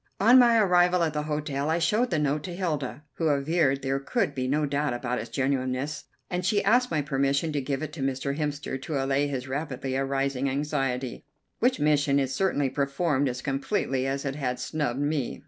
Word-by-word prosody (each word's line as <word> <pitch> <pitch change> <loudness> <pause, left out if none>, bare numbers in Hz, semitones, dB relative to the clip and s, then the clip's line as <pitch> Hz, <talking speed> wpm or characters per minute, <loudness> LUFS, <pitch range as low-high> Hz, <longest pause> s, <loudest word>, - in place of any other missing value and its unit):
On 240 +6 +7
my 235 -2 +6
arrival 180 -3 +4
at 160 -2 0
the 150 - -1
hotel 150 -1 -2
I 160 - +2
showed 210 +9 +2
the 170 - 0
note 150 0 0
to 175 - -5
Hilda, 150 -6 -3
who 165 - +1
averred 140 -1 +1
there 135 0 0
could 190 - -1
be 130 -2 -2
no 150 +3 +1
doubt 145 -2 -1
about 125 0 -2
its - - -6
genuineness, 135 +1 -1 0.2
and 180 0 -2
she 205 +2 +2
asked 245 +5 +3
my 155 -3 0
permission 140 +2 0
to 145 -1 -1
give 135 +2 -2
it 150 -1 -5
to 155 - -6
Mr. 135 +1 -1
Hemster 145 -3 -3
to 155 +1 -4
allay 135 +1 +1
his 130 -2 -4
rapidly 135 -1 -3
arising 135 0 0
anxiety, 135 -3 -2 0.4
which 255 +2 +2
mission 145 -1 +3
it 135 -2 -1
certainly 145 -2 +1
performed 140 0 0
as 125 0 -5
completely 135 -2 -1
as 135 +1 -2
it 135 - -1
had 125 -4 -2
snubbed 145 -5 -2
me. 145 -2 -1
145 Hz, 200 wpm, -27 LUFS, 135-160 Hz, 0.4 s, On